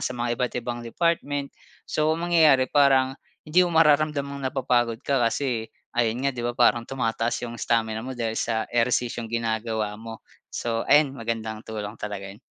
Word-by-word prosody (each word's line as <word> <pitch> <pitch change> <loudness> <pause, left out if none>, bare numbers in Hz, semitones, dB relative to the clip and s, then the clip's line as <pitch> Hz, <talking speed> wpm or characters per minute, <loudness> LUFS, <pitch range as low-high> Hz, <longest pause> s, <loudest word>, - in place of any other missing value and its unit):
sa - - -2
mga 120 0 -1
iba't-ibang 120 -1 -2
department. 145 0 -1 0.3
So 155 0 0
ang 170 - -3
mangyayari 150 -6 +5
parang 135 -2 +4 0.3
hindi 160 +4 +3
mo 170 - -5
mararamdamang 150 -2 +3
napapagod 120 -4 0
ka 140 -2 +1
kasi 115 -1 0 0.2
ayun 120 +2 0
nga 140 - +3
di 125 - -6
ba, 120 0 -3
parang 120 -1 +3
tumataas 115 -2 -1
yung 120 0 -7
stamina 110 -2 0
mo 130 +2 -6
dahil 115 -2 -1
sa 110 -1 0
ehersisyong 120 -1 0
ginagawa 110 -2 -2
mo. 115 0 -9 0.2
So 115 -1 -3
ayan 145 -1 +5
magandang 115 -3 -4
tulong 110 0 -5
talaga 100 -2 -5
'yon. 105 - -17
120 Hz, 165 wpm, -25 LUFS, 115-140 Hz, 0.3 s, mangyayari